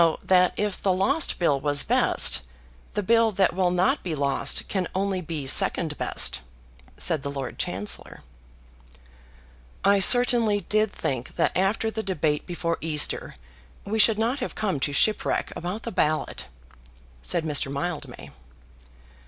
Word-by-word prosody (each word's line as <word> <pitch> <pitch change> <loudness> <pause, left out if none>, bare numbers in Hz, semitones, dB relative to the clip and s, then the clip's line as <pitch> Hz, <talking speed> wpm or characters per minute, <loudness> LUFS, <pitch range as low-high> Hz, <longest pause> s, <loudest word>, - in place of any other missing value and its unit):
"So 165 -1 +2
that 180 -1 +3
if 210 -2 -2
the 195 - +1
lost 265 - +2
bill 145 -6 +1
was 145 0 +1
best, - - +3 0.5
the 210 - -1
bill 230 +2 +3
that 190 0 +1
will 185 0 +1
not 185 +11 +1
be 170 -4 -4
lost 140 -2 0
can 185 -3 -2
only 190 -1 -1
be 155 -4 -5
second 135 - +1
best," - - 0 0.6
said 160 -4 0
the 140 - -5
Lord 135 -2 -6
Chancellor. 100 +3 -4 1.6
"I 200 0 +4
certainly 230 -1 +5
did 215 +3 0
think 130 -9 -5
that - - 0
after 205 +4 0
the 220 - -4
debate 155 -7 -2
before 170 -2 -3
Easter 155 -2 -1 0.5
we 220 +2 -2
should 215 0 +6
not 235 +5 -1
have 255 - -5
come 195 -9 -2
to 145 - -1
shipwreck 210 +9 0
about 185 +6 -5
the - - -5
ballot," 155 -4 -2 0.7
said 60 - -1
Mr. 145 -3 0
Mildmay. 150 +3 -6
180 Hz, 145 wpm, -24 LUFS, 150-210 Hz, 1.6 s, should